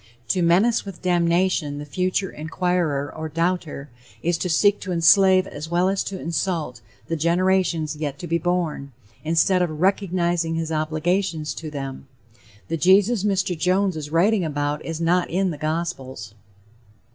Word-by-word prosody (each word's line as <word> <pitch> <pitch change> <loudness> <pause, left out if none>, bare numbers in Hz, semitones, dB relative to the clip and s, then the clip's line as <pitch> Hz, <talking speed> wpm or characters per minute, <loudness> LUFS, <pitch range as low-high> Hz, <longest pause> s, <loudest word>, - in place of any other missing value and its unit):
To 185 - +1
menace 190 +8 +3
with 195 -4 -10
damnation 175 -3 +1
the 145 - -6
future 185 +4 -1
inquirer 160 -2 -1
or 160 0 -5
doubter 165 -4 -2 0.3
is 175 +1 +1
to 180 - -2
seek 205 +5 +3
to 190 - -6
enslave 185 +2 +5
as 155 -4 -8
well 175 +2 +2
as 195 0 0
to 190 -1 -5
insult 165 -7 -2 0.2
the 165 - -2
generations 170 -1 +1
yet 145 -2 -4
to 175 - -7
be 170 0 0
born, 170 -5 -2 0.3
instead 165 +4 +2
of 155 -4 -2
"recognizing 175 -3 +1
his 165 0 -3
obligations" 160 +1 -1
to 160 - -7
them. 135 -2 -6 0.6
The 165 - -2
Jesus 195 +5 +4
Mr. 190 -3 0
Jones 185 +3 +1
is 150 -2 -5
writing 185 +5 +2
about 145 -1 -2
is 165 -1 -5
not 175 +2 +1
in 185 +1 0
the 150 - -6
gospels. 145 - -4
170 Hz, 155 wpm, -23 LUFS, 155-185 Hz, 0.6 s, enslave